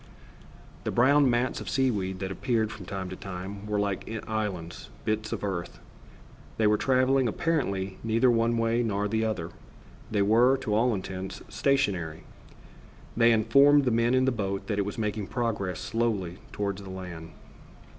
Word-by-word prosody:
The -, -, -2 dB
brown 140 Hz, +3 st, +4 dB
mats 120 Hz, +1 st, 0 dB
of -, -, -6 dB
seaweed 105 Hz, -9 st, 0 dB
that 95 Hz, 0 st, -3 dB
appeared 110 Hz, 0 st, 0 dB
from 95 Hz, -6 st, -9 dB
time 95 Hz, 0 st, -4 dB
to 95 Hz, -, -6 dB
time 95 Hz, +2 st, -7 dB
were 105 Hz, 0 st, -1 dB
like 100 Hz, -1 st, -2 dB, 0.2 s
islands, 100 Hz, -7 st, -4 dB, 0.2 s
bits 110 Hz, 0 st, -1 dB
of -, -, -4 dB
earth. 95 Hz, -4 st, -3 dB, 0.8 s
They 110 Hz, -, +2 dB
were 105 Hz, 0 st, +5 dB
traveling, 130 Hz, +2 st, +2 dB
apparently, 100 Hz, -, -1 dB
neither 115 Hz, +3 st, +3 dB
one 115 Hz, 0 st, +2 dB
way 115 Hz, +1 st, +1 dB
nor 105 Hz, -3 st, 0 dB
the 110 Hz, +2 st, 0 dB
other. 90 Hz, -7 st, -2 dB, 0.6 s
They 105 Hz, -2 st, +2 dB
were, 120 Hz, +6 st, +4 dB
to 110 Hz, -5 st, -2 dB
all 115 Hz, +2 st, +3 dB
intents, 95 Hz, 0 st, -6 dB
stationary. 95 Hz, -, 0 dB, 0.9 s
They 115 Hz, 0 st, +5 dB
informed 140 Hz, +6 st, +5 dB
the 125 Hz, -, +2 dB
men 115 Hz, +2 st, +2 dB
in 130 Hz, 0 st, +3 dB
the 130 Hz, -, +3 dB
boat 100 Hz, -4 st, -3 dB
that 105 Hz, -2 st, -2 dB
it 100 Hz, -, +1 dB
was 100 Hz, -, -5 dB
making 105 Hz, -2 st, -2 dB
progress 105 Hz, -7 st, -2 dB
slowly 105 Hz, -6 st, -1 dB
toward 100 Hz, -1 st, -2 dB
the 100 Hz, -1 st, -9 dB
land. 90 Hz, -3 st, -8 dB
110 Hz, 165 wpm, -28 LUFS, 95-120 Hz, 0.9 s, were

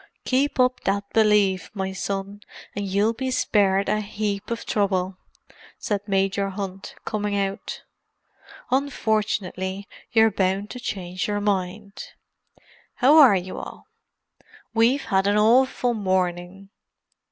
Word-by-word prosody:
"Keep 270 Hz, +1 st, +1 dB
up 255 Hz, 0 st, +3 dB
that 200 Hz, +1 st, 0 dB
belief, 210 Hz, -5 st, +3 dB
my 190 Hz, -1 st, -2 dB
son, 195 Hz, +1 st, -4 dB, 0.3 s
and 200 Hz, -1 st, -3 dB
you'll 200 Hz, +4 st, +1 dB
be 260 Hz, +3 st, -3 dB
spared 200 Hz, -6 st, +2 dB
a 210 Hz, +2 st, +1 dB
heap 205 Hz, 0 st, -3 dB
of 235 Hz, 0 st, -4 dB
trouble," 190 Hz, -2 st, 0 dB, 0.6 s
said 205 Hz, -2 st, -2 dB
Major 195 Hz, 0 st, 0 dB
Hunt, 195 Hz, -1 st, -6 dB
coming 210 Hz, -1 st, -2 dB
out. 195 Hz, 0 st, -3 dB, 0.9 s
"Unfortunately, 215 Hz, -7 st, -1 dB, 0.2 s
you're 225 Hz, -1 st, +5 dB
bound 195 Hz, +1 st, -1 dB
to 250 Hz, -, -7 dB
change 185 Hz, -6 st, -4 dB
your 205 Hz, 0 st, -1 dB
mind. 200 Hz, 0 st, -3 dB, 0.8 s
How 275 Hz, +5 st, +5 dB
are 265 Hz, -9 st, +8 dB
you 185 Hz, 0 st, -4 dB
all? -, -, -9 dB, 0.9 s
We've 235 Hz, +5 st, +3 dB
had 195 Hz, 0 st, +1 dB
an 205 Hz, +1 st, +3 dB
awful 245 Hz, +3 st, +3 dB
morning!" 185 Hz, -1 st, -2 dB
200 Hz, 120 wpm, -24 LUFS, 195-220 Hz, 0.9 s, are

